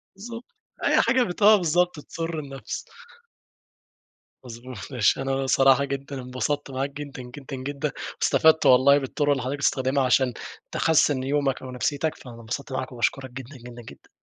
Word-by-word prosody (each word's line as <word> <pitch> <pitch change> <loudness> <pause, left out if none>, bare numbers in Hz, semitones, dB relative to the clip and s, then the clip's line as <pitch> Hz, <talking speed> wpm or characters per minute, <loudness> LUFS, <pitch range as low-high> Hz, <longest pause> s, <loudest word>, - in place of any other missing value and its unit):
بالضبط 230 +4 -8 0.4
أي - - +4
حاجة 255 -1 +3
بت 180 -2 -5
آه 215 +1 +8
بالضبط 175 -1 +1
تسر 165 +1 -5
النفس. 135 -5 -6 1.6
مضبوط 120 0 -9
ماشي 125 +1 +2
أنا 135 0 -1
صراحة 135 +1 +4
جدًا 140 -1 -5
انبسطت 135 +3 -3
معاك 135 +2 -2
جدًا، 140 -2 -8
جدًا، 130 +2 -9
جدًا 140 +2 -3 0.3
واستفدت 160 0 +4
والله 130 +3 +6
بالطرق 145 +1 -1
اللي 135 -3 +1
حضرتك 135 +3 -3
بتستخدمها 135 0 +1
عشان 130 -1 +2 0.4
تحسن 145 -4 +2
يومك 140 -1 0
أو 130 -1 -8
نفسيتك، 145 +5 -1
فأنا 120 -3 -12
انبسطت 135 +5 -5
معاك 130 0 -3
وباشكرك 130 +2 -2
جدًا، 130 +2 -9
جدًا، 120 0 -11
جدًا. 110 - -14
135 Hz, 150 wpm, -25 LUFS, 130-145 Hz, 1.6 s, آه